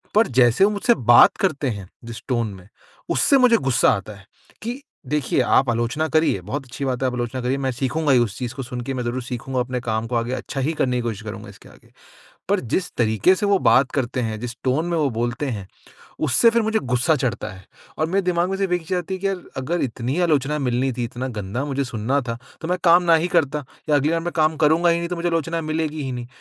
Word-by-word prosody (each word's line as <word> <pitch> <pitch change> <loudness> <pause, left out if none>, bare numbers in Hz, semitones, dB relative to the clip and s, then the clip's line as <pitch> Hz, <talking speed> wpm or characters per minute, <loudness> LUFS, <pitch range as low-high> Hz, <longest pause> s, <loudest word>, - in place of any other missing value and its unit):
पर 220 - +5
जैसे 120 +7 +4
वो 210 - +2
मुझसे 220 +3 +2 0.2
बात - - +7
करते 150 -8 0
हैं, 100 -5 -6 0.2
जिस 115 0 -8
टोन 120 -3 0
में, 95 -1 -14 0.4
उससे 280 - +4
मुझे 250 -3 +5
ग़ुस्सा 135 - +2
आता 100 +1 -5
है। 95 - -16 0.4
कि 245 +5 -4 0.3
देखिए 150 -4 0
आप 130 +1 +3
आलोचना 120 +7 0
करिए, 155 - +2
बहुत 135 +9 -5
अच्छी 135 +2 -6
बात 130 -1 -2
है - - +3
आप 125 - -2
आलोचना 120 +1 -3
करिए। 125 +2 0
मैं 135 -1 -1
सीखूँगा 140 +5 -1
ही 125 - +5
उस 110 -5 -1
चीज़ 125 -1 -4
को 135 - -5
सुन 125 0 -6
के, 135 +2 -4
मैं 125 - -3
ज़रूर 125 +2 -3
सीखूँगा, 125 +1 -4
अपने 125 0 -3
काम 110 -2 -2
को 120 - -3
आगे 115 +2 -1
अच्छा 135 +1 -5
ही 150 +5 0
करने 125 -5 0
की - - -1
कोशिश 110 -3 -3
करूँगा 105 -1 -8
इसके - - -15
आगे। - - -20 0.6
पर 200 0 +2
जिस 180 -1 -1
तरीके 110 - +3
से 205 +2 -1
वो 200 -1 +3
बात 125 -1 +4
करते 130 -2 -1
हैं, 110 -2 -3
जिस 120 0 -6
टोन 135 +6 +1
में 170 - 0
वो 150 -3 +2
बोलते 120 +5 -2
हैं, 105 -7 -4 0.5
उससे 155 - +4
फिर 230 0 +2
मुझे 220 0 +1
ग़ुस्सा 125 +5 +2
चढ़ता 120 -5 -2
है। 95 -1 -14 0.3
और 155 - +2
मेरे 195 +4 +1
दिमाग 180 0 +1
में 195 - -2
सिर्फ़ 195 -2 0
एक 180 - +2
ही 160 - -18
चीज़ 185 - 0
आती 180 +2 -5
है - - -8
कि 200 - +1
यार 190 -2 -2 0.2
अगर 165 +7 -1
इतनी 125 +2 -3
ही 180 - +1
आलोचना 150 -3 +1
मिलनी 130 0 0
थी, 120 - -3
इतना 125 +2 -5
गंदा 105 +8 -3
मुझे 140 -1 -1
सुनना 130 +2 -1
था 115 - -3 0.2
तो 160 - -4
मैं 180 +1 0
काम 175 +1 +6
नहीं 165 +1 +4
करता 145 -2 0 0.2
या 150 - +4
अगली 145 +2 +2
बार 165 - +1
मैं 175 - -3
काम 155 -1 +2
करूँगा 165 +3 +4
ही 170 - +3
नहीं 170 0 -4
तो 180 - -2
मुझे 170 +1 -2
आलोचना 165 0 -1
मिलेगी 155 -1 -2
ही 135 - -3
नहीं। 120 -1 -5
135 Hz, 255 wpm, -22 LUFS, 120-165 Hz, 0.6 s, बात